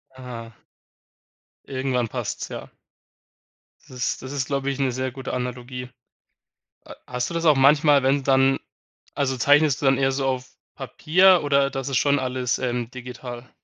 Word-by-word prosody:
Ah. 115 -3 -9 1.1
Irgendwann 130 -2 -1
passt's, - - -5
ja. - - -8 1.2
Das - - -21
ist 125 - -2
das 130 - -8
ist, 140 -3 -2
glaube 140 -1 -1
ich, 135 0 -3
'ne 135 -2 +1
sehr 130 +1 -3
gute 130 +1 -6
Analogie. 125 0 -5 1.0
Ha - - -11
hast 125 0 -3
du - - -6
das 165 0 -2
auch 155 -2 +6
manchmal, 145 +1 +5
wenn 135 +1 +2
dann 135 0 +3 0.6
also 135 -2 0
zeichnest 145 +3 +3
du - - -1
dann 135 0 +4
eher 135 0 +2
so 135 0 -2
auf 130 -1 -2 0.3
Papier 180 +2 +3
oder 140 -1 +2
das 135 0 -4
ist 135 - +1
schon 140 0 +2
alles, 125 -1 -1
ähm, 120 -2 -2
digital? 125 -1 -9
130 Hz, 165 wpm, -23 LUFS, 125-140 Hz, 1.2 s, auch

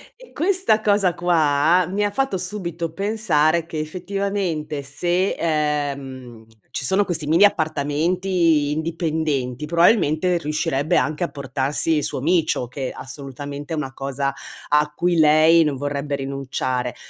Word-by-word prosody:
e - - -17
questa 360 - +2
cosa 200 -4 +2
qua 165 0 +3
mi 200 +3 -1
ha 205 - +1
fatto 235 -2 -1
subito 175 -3 -4
pensare 170 -5 +1
che 160 - -6
effettivamente 175 -2 -3
se, 175 +7 0
ehm, 140 -7 -2 0.2
ci - - -3
sono 195 +7 +2
questi 160 -5 -3
mini 165 +6 +4
appartamenti 160 -1 +1
indipendenti, 155 -4 -2
probabilmente 170 0 +3
riuscirebbe 150 -1 0
anche 155 +3 0
a 170 - -1
portarsi 140 +3 -1
il 150 - -1
suo - - -3
micio, 160 -3 +1
che 130 +1 -5
assolutamente 140 +2 -7
è - - -2
una 135 -3 -4
cosa 140 0 -3 0.4
a 150 0 +2
cui 175 0 +1
lei 155 +2 +6
non 150 -3 -1
vorrebbe 145 +1 -3
rinunciare. 130 -2 -3
155 Hz, 135 wpm, -21 LUFS, 140-180 Hz, 0.4 s, lei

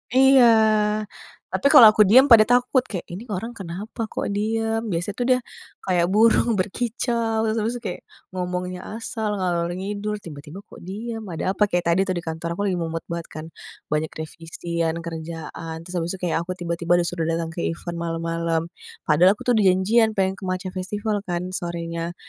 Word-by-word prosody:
Iya, 265 -1 +7 1.0
tapi - - +1
kalo 250 -4 +9
aku 215 - +3
diem 260 +6 +6
pada 215 -2 +8
takut, 245 +2 +3
kayak 185 -5 -3
"ini 205 +8 -8
orang 220 +3 -4
kenapa 205 +3 -6
kok - - -4
diem, 225 +2 0
biasa 175 0 -2
tuh 245 - +1
dia 255 -1 +4 0.4
kayak 180 -2 +2
burung, 225 +3 +4
berkicau, 225 +2 -1
terus 220 0 0
terus 225 +3 -1
kayak 185 -5 -5 0.3
ngomongnya 180 0 -3 0.2
asal, 220 -2 -3
ngalor 175 -3 0
ngidul, 205 +2 -3
tiba-tiba 150 +4 -10
kok - - -15
diam, 220 +2 -6
ada 180 +1 -2
apa." 205 +2 +2
Kayak 175 -2 0
tadi 170 - +2
tuh 185 - -1
di 175 - -4
kantor 165 +1 -4
aku 200 - -4
lagi 180 - -1
mumet 165 -1 -3
banget 170 -1 -4
kan, 155 - -6 0.5
banyak 150 +1 +1
revisian, 165 +1 -4
kerjaan, 165 0 -6
terus 180 - -10
habis 165 - -3
itu - - -12
kayak 175 - +1
aku 170 +2 -4
tiba-tiba 170 -1 -3
udah 170 -1 -2
datang 165 0 -2
ke 170 - -7
event 170 +1 -5
malam-malam, 165 0 -1 0.4
padahal 180 +6 +4
aku - - -11
tuh 245 - +1
udah 205 - +3
janjian, 220 +4 +2
pengen 190 0 0
ke 190 - -6
Matcha 185 +1 -3
Festival 205 +3 -2
kan 180 +1 -3
sorenya, 170 -1 -4
185 Hz, 180 wpm, -23 LUFS, 170-215 Hz, 1.0 s, kalo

